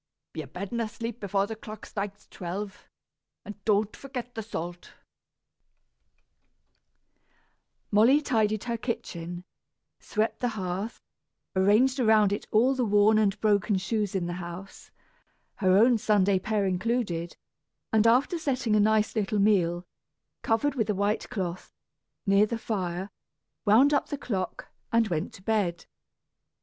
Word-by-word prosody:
Be 160 - -4
abed 180 +7 -7
and 235 -1 -1
asleep 230 +1 -5
before 200 -1 0
the 220 +2 -6
clock 215 0 -10
strikes 200 0 -6
twelve; 195 +2 -6 0.6
and 210 -1 -10
don't 210 0 +2
forget 250 -3 -7
the 225 - -4
salt." 175 -5 -6 3.0
Molly 230 +8 +6
tidied 215 -7 0
her 235 -1 -2
kitchen, 175 -7 -5 0.6
swept 215 +1 -1
the 245 - 0
hearth, 190 +4 -3 0.6
arranged 215 +8 +4
around 215 -4 +4
it 205 - -4
all 240 +5 +4
the 260 -2 0
worn 210 0 +4
and 205 -1 +1
broken 205 -1 +2
shoes 205 +1 -1
in 185 -2 0
the 175 - -3
house, 175 +3 -9 0.7
her 185 -1 +4
own 235 +2 +5
Sunday 200 -3 +3
pair 210 +1 0
included; 185 -3 -1 0.6
and, 220 0 +5
after 270 +9 +3
setting 255 -7 0
a - - +4
nice 215 +1 +2
little 210 -1 0
meal, 180 -4 +2 0.6
covered 235 +6 +1
with 225 -5 -1
a 210 - +1
white 205 +2 -1
cloth, 185 -6 -4 0.5
near 200 +1 +4
the 230 - -3
fire, 190 -3 -3 0.5
wound 245 +8 +5
up 285 - +1
the 290 - -3
clock 195 -9 -4 0.2
and 230 -1 +3
went 160 -3 -2
to 185 - -15
bed. 195 -6 0
210 Hz, 135 wpm, -27 LUFS, 190-230 Hz, 3.0 s, Molly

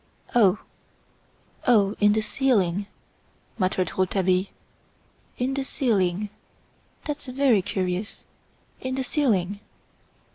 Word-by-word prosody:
"Oh! 210 -5 +5 1.1
oh! 205 -5 +5
in 205 0 +5
the 220 - +1
ceiling!" 205 -6 +1 0.7
muttered 185 -2 +1
Rouletabille. 185 0 +1 0.9
"In 255 +2 0
the 275 0 -1
ceiling! 205 -7 0 0.8
That's 295 -2 -5
very 255 -5 +3
curious! 185 +1 -3 0.5
In 260 0 -3
the 265 - -1
ceiling!" 205 - 0
205 Hz, 95 wpm, -25 LUFS, 185-255 Hz, 1.1 s, Oh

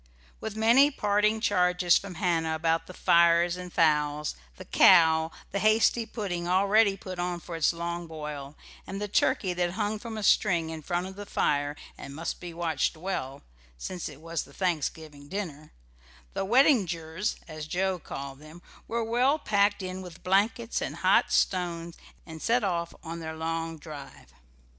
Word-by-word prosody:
With 220 -1 -5
many 235 +6 +5
parting 210 -3 +1
charges 180 -4 +3
from 195 -2 -2
Hannah 165 -2 0
about 165 0 0
the 185 - -9
fires 170 0 +4
and 180 0 -8
fowls, 150 -2 +1 0.2
the - - -10
cow, 160 -3 +6 0.2
the 200 - -1
hasty 220 +2 +3
pudding, 185 -7 -4
already 200 +2 +3
put 185 -2 -8
on 175 0 -2
for 170 0 -8
its 165 - +3
long 170 0 -4
boil, 150 -3 -7 0.3
and 195 - -5
the 210 - -3
turkey 190 -2 +1
that 175 0 -1
hung 210 +1 -2
from 225 0 -7
a 215 - -4
string 175 -6 +3
in 160 -1 -6
front 175 +4 -2
of 190 0 -8
the 205 0 -8
fire 145 -4 0 0.2
and 140 - -8
must 165 +2 -4
be 175 -1 -7
watched 165 -3 -1
well, 155 -6 -4 0.3
since 175 - -5
it 145 0 -13
was 165 -1 -3
the 140 - -13
Thanksgiving 155 -4 -3
dinner, 155 -5 -6 0.6
the - - -2
"weddingers," 190 - +2
as 155 -2 -7
Joe 185 +2 -1
called 140 -3 -7
them, 155 +3 -14 0.2
were 230 0 -1
well 245 +6 +2
packed 205 -7 +1
in 185 0 -5
with 180 -2 -11
blankets 215 +5 +1
and - - -3
hot - - +3
stones 170 -2 0 0.3
and 160 -2 -10
set 235 0 +2
off 170 -3 -2
on 165 +1 -6
their 160 -1 -6
long 165 0 -3
drive. 150 -2 -11
175 Hz, 165 wpm, -28 LUFS, 160-200 Hz, 0.6 s, cow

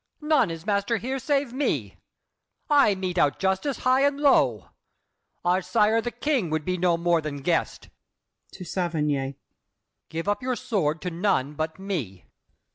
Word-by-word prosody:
None 300 - +2
is 165 0 -7
master 205 +2 +1
here 260 +6 -3
Save 275 -1 0
me! 280 +3 -1 0.8
I 280 -9 +5
mete 185 -2 -2
out 145 -3 +3
justice 190 +9 0
high 255 +1 +4
and 285 0 +2
low. 135 - +3 0.8
Our 180 +2 +3
sire 220 +3 +2
the 240 - -3
King 240 - -1
would 155 -1 -2
be 185 - 0
no 175 -1 +2
more 170 -1 +2
than 145 -3 -6
guest. 170 +2 -1 0.6
[To 185 - -8
Saverny.] 150 -7 -1 0.7
Give 165 +3 -4
up 205 +4 0
your 255 0 -1
sword 165 -11 -1
to 180 - -2
none 165 -6 0
but 160 +1 -3
me. 155 - -5
190 Hz, 155 wpm, -25 LUFS, 160-240 Hz, 0.8 s, I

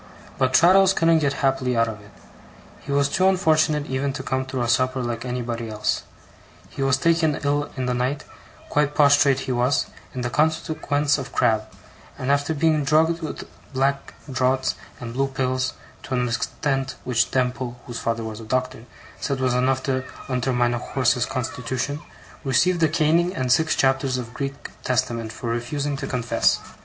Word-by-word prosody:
But 130 0 +2
Traddles 185 +4 +6
couldn't 165 -1 +4
get 140 -2 +1
happily 130 -2 +1
out 115 0 +3
of 105 -2 -6
it. 105 - -16 0.7
He 140 - -8
was 140 0 +3
too 185 +6 +2
unfortunate 155 -5 +2
even 135 +1 -2
to 130 - -5
come 130 0 -2
through 130 -2 -2
a - - -1
supper 130 +2 +1
like 120 0 -3
anybody 120 -2 -3
else. 105 -1 -1 0.7
He - - -6
was 135 -1 +3
taken 165 -2 +2
ill 145 +1 0
in 130 - -1
the 125 - 0
night 130 +4 -1 0.4
quite 150 0 +1
prostrate 140 -2 +5
he 130 - -3
was 125 +2 +2 0.3
in 125 - -3
consequence 150 0 +1
of 135 - -6
Crab; 110 -3 +2 0.5
and 130 +2 -1
after 145 +3 +1
being 155 0 +2
drugged 160 +4 +2
with 155 - -6 0.3
black 135 +1 0
draughts 130 0 +1 0.3
and 115 -2 -6
blue 135 +2 +1
pills, 130 -1 -1 0.3
to 130 - -4
an 125 0 +1
extent 135 +3 -2
which 115 -2 +1
Demple 125 -1 -1
(whose 120 -1 -6
father 115 0 -1
was 110 -1 -6
a - - -8
doctor) 130 0 -2 0.3
said 140 -2 -2
was 130 -1 +1
enough 130 +1 +1
to 130 -1 -1 0.2
undermine 125 -1 +1
a 120 - -1
horse's 125 -1 +1
constitution, 130 +2 -3 0.4
received 155 +6 +2
a 160 - +5
caning 170 +3 +2
and 130 -1 -1
six 160 +5 +3
chapters 135 -1 +1
of 120 -2 -6
Greek 140 0 -5
Testament 120 -3 -1
for 115 +1 -4
refusing 140 +5 -2
to 135 - -4
confess. 125 -2 +1
130 Hz, 170 wpm, -23 LUFS, 125-145 Hz, 0.7 s, Traddles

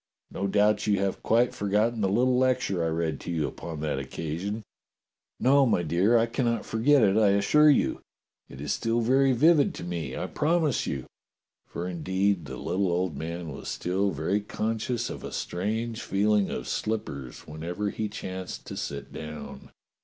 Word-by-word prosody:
No 100 - -2
doubt 105 +2 +2
you 105 -1 +3
have 95 0 -1
quite 120 +2 +3
forgotten 105 +3 +1
the 95 - +2
little 125 +5 +3
lecture 125 -8 +1
I - - +1
read 80 0 -1
to - - -6
you 80 -3 0
upon 80 -3 -7
that 75 -3 -1
oc 65 -1 -7
casion?" 90 +10 -4 0.8
"No, 140 +2 +5
my 90 -6 +2
dear, 90 +9 +3
I 115 - +4
cannot 115 -1 -1
forget 125 +4 +3
it, 100 0 +4
I 105 -3 +5
assure 150 +10 +5
you. 145 - +2 0.5
It - - -11
is 75 +1 -1
still 115 +1 0
very 135 +3 +4
vivid 155 - +4
to - - -7
me, 85 -7 -4
I - - -2
promise 155 -2 +1
you." 65 -2 -3 0.6
For 85 - -5
indeed 95 +1 0
the - - -7
little 95 0 0
old 90 -1 0
man 85 +1 -5
was 70 - -7
still 95 +3 0
very 95 +5 -1
conscious 115 +3 -2
of - - -7
a - - -6
strange 110 +5 -2
feeling 105 0 +2
of 60 - -4
slippers 70 - -3
whenever 85 +7 -4
he 110 -1 -3
chanced 95 -3 -6
to - - -7
sit 70 -1 -5
down. 75 -1 -8
100 Hz, 175 wpm, -27 LUFS, 85-115 Hz, 0.8 s, No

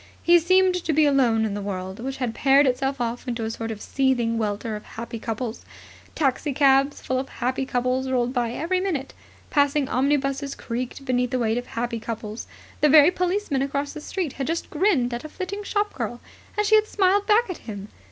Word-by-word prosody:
He 345 0 +6
seemed 370 +2 +4
to 320 - 0
be 310 +1 +4
alone 245 -6 +3
in 210 - -2
the 205 - -4
world 190 0 -5
which 265 +3 -4
had 245 -4 -2
paired 275 +4 +4
itself 270 +1 0
off 240 +1 -3
into 235 -2 -2
a 220 - -2
sort 225 0 -5
of 215 -2 -6
seething 255 -4 +1
welter 215 +1 -2
of 210 - -7
happy 230 0 -7
couples. 225 +1 -4 0.5
Taxicabs 275 -1 +2
full 255 0 -1
of 265 - -5
happy 260 +1 -2
couples 255 +1 0
rolled 250 -1 0
by 240 -3 0
every 335 +9 -1
minute. 330 -8 -2 0.4
Passing 285 -1 +2
omnibuses 275 +1 0
creaked 250 +3 -5
beneath 250 -1 +1
the 255 - -1
weight 230 -1 +1
of 245 - -9
happy 235 0 -3
couples. 220 -1 -6 0.3
The 300 - +4
very 300 +3 +8
policeman 360 -6 -1
across 280 +1 -2
the 305 - -7
Street 345 -3 -3
had 270 - -4
just 330 +1 -3
grinned 300 -8 +2
at 240 - -4
a 310 - -7
flitting 390 +5 -5
shop 415 +1 -1
girl, 240 0 -4 0.4
and 420 - +2
she 430 - +1
had 430 0 +5
smiled 400 0 +2
back 450 +3 +4
at 365 - -5
him. 200 -1 -6
265 Hz, 200 wpm, -24 LUFS, 235-305 Hz, 0.5 s, very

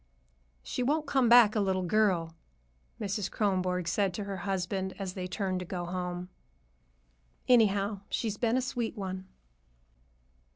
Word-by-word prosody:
"She 250 - -3
won't 300 +5 +1
come 265 -4 +2
back 235 -3 +7
a - - +2
little 190 -2 +1
girl," 180 -4 +2 0.7
Mrs. 200 -1 -2
Kronborg 185 -4 0
said 190 +1 +1
to 210 - -3
her 200 -1 -5
husband 190 0 -2
as 190 -2 -4
they 185 -1 -4
turned 185 0 -2
to - - -4
go 175 -1 -4
home. 180 0 -4 1.2
"Anyhow, 205 -4 +3
she's 220 -3 -1
been 235 +2 +1
a 260 - 0
sweet 240 -3 -3
one." 190 -1 -5
195 Hz, 140 wpm, -30 LUFS, 185-220 Hz, 1.2 s, back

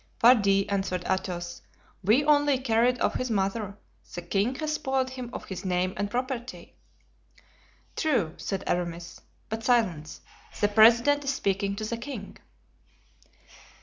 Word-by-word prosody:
"Pardi," 200 -5 +5
answered 190 -3 -2
Athos 180 -2 -3 0.4
"we 230 +10 +3
only 290 -2 +4
carried 250 0 +2
off - - +2
his 255 - -2
mother; 200 0 -1 0.4
the 175 - -5
king 200 +8 0
has 305 +2 -2
spoiled 265 -3 -1
him 255 -2 -6
of - - -7
his 190 - -7
name 185 0 0
and 205 0 -2
property." 250 +1 -5 1.2
"True," 230 - 0
said 195 -1 -4
Aramis; 170 -1 -3 0.3
"but 220 +1 -5
silence! 185 -12 0 0.4
the 205 - +2
president 235 +7 +5
is 275 0 -1
speaking 195 -3 -1
to 215 +1 -4
the 230 +2 -3
king." 235 -4 -8
220 Hz, 135 wpm, -27 LUFS, 190-255 Hz, 1.2 s, Pardi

